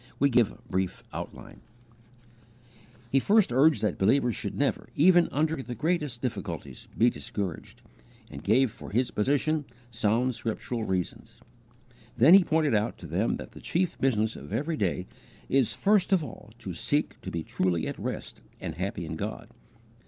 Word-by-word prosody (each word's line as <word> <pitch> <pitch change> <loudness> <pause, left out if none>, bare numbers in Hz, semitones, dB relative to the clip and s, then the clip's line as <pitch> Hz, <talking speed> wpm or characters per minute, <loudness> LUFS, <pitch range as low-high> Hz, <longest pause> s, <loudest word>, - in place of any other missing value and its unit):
We 140 0 +3
give 120 -3 +4
a - - -13
brief 95 -3 -2
outline: - - -8 1.5
He 135 - +5
first 205 - +3
urged 135 -3 +4
that 105 -4 0
believers 120 +3 +3
should - - -5
never, - - -1
even 175 +2 +5
under 155 +3 +1
the 125 -2 -6
greatest 150 -6 -1
difficulties, 85 - -5
be 120 +1 +5
discouraged, 100 -8 -6 0.4
and 70 - -10
gave 120 +4 +3
for - - -10
his 125 +4 0
position 145 +7 +1 0.3
sound 115 +2 +1
scriptural 115 0 -3
reasons. 95 -3 -3 0.8
Then 140 +9 +7
he 195 -1 +9
pointed 155 -5 +2
out 105 +1 +1
to - - -11
them 90 +8 0
that - - -8
the - - -12
chief 175 0 0
business 110 -4 +1
of 70 +1 -10
every 160 +3 -1
day 90 - -1 0.4
is 135 -3 +2
first 200 -1 +2
of 185 -4 +4
all 110 -6 -10
to 100 -6 -6
seek 120 - -1
to - - -6
be 85 -1 -3
truly 85 -2 0
at - - -5
rest - - -5 0.2
and - - -4
happy 85 - -3
in 80 0 -5
God. - - -5
120 Hz, 165 wpm, -28 LUFS, 100-150 Hz, 1.5 s, he